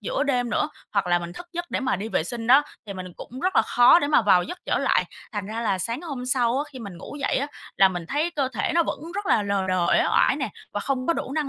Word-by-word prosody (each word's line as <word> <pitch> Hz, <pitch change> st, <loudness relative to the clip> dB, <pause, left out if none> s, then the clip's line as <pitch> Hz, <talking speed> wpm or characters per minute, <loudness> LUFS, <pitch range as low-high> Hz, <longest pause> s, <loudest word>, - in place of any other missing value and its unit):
giữa 225 Hz, +6 st, -1 dB
đêm 250 Hz, -4 st, 0 dB
nữa, 260 Hz, -, +1 dB, 0.2 s
hoặc 200 Hz, -3 st, +1 dB
là 175 Hz, 0 st, +3 dB
mình 175 Hz, 0 st, -7 dB
thức 350 Hz, -, -9 dB
giấc 345 Hz, 0 st, -5 dB
để -, -, -1 dB
mà 260 Hz, -7 st, 0 dB
đi 210 Hz, +4 st, -5 dB
vệ 220 Hz, -, 0 dB
sinh 225 Hz, +4 st, -5 dB
đó, 270 Hz, +4 st, +7 dB, 0.2 s
thì 200 Hz, -, -5 dB
mình 185 Hz, -1 st, -7 dB
cũng 255 Hz, +2 st, -9 dB
rất 370 Hz, +6 st, 0 dB
là -, -, +6 dB
khó 245 Hz, +7 st, +6 dB
để 285 Hz, -, 0 dB
mà 295 Hz, -, +4 dB
vào 185 Hz, -4 st, +5 dB
giấc 355 Hz, -, -7 dB
trở -, -, +1 dB
lại. -, -, +2 dB, 0.3 s
Thành 205 Hz, -2 st, -4 dB
ra 220 Hz, +2 st, -4 dB
là 200 Hz, -5 st, 0 dB
sáng 230 Hz, -, -3 dB
hôm 275 Hz, -7 st, -5 dB
sau 250 Hz, -1 st, +2 dB
á, 285 Hz, -, -1 dB
khi 260 Hz, -, -8 dB
mình 200 Hz, -7 st, -8 dB
ngủ 290 Hz, -, -9 dB
dậy -, -, +1 dB
á, 280 Hz, -, 0 dB, 0.3 s
là 195 Hz, 0 st, +6 dB
mình 175 Hz, -2 st, -5 dB
thấy 300 Hz, -, 0 dB
cơ 280 Hz, -6 st, -1 dB
thể -, -, -1 dB
nó 340 Hz, -, +5 dB
vẫn -, -, -4 dB
rất 405 Hz, 0 st, -3 dB
là 215 Hz, -, +3 dB
lờ 200 Hz, -1 st, -1 dB
đờ, 185 Hz, -2 st, +1 dB
uể -, -, +4 dB
oải -, -, +4 dB
nè, -, -, -2 dB, 0.2 s
và -, -, -2 dB
không 260 Hz, -2 st, -2 dB
có -, -, +3 dB
đủ 275 Hz, -, -4 dB
năng 300 Hz, -2 st, -1 dB
245 Hz, 300 wpm, -24 LUFS, 200-285 Hz, 0.3 s, đó